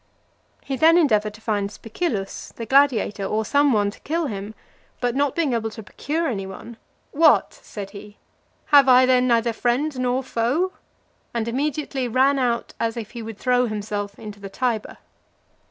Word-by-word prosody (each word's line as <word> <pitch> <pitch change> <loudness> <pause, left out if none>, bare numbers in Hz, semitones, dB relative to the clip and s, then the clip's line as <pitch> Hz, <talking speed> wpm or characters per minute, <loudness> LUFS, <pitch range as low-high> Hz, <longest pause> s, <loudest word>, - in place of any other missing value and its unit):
He 270 -1 -3
then 325 +5 +6
endeavoured 215 -10 +2
to 220 - -16
find 205 -3 -1
Spicillus, 220 - -4
the 230 - -6
gladiator, 245 -6 +3
or 215 +3 -1
some 285 +4 +3
one 205 -3 +2
to - - -16
kill 330 +2 -2
him; 210 -3 -5 0.4
but 245 -1 0
not 280 -1 +1
being 315 -6 +1
able 225 -1 -1
to 220 0 -10
procure 320 - -3
any 195 -6 -3
one, 220 +4 -10 0.3
"What!" 315 +2 +4
said 200 -2 -9
he, 205 0 -11 0.6
"have 280 -2 +8
I 255 0 +7
then 255 0 +3
neither 235 -1 +2
friend 255 +5 -1
nor 255 +1 0
foe?" 260 +9 0 0.6
and 230 -1 -1
immediately 270 +1 -2
ran 265 +4 +3
out, 240 -2 -1
as 230 +1 -1
if 220 -2 -6
he 240 - -7
would 225 -2 -7
throw 250 0 +2
himself 205 -1 -4
into 210 -2 -9
the 200 -1 -8
Tiber. 230 0 -2
235 Hz, 170 wpm, -23 LUFS, 215-270 Hz, 0.6 s, have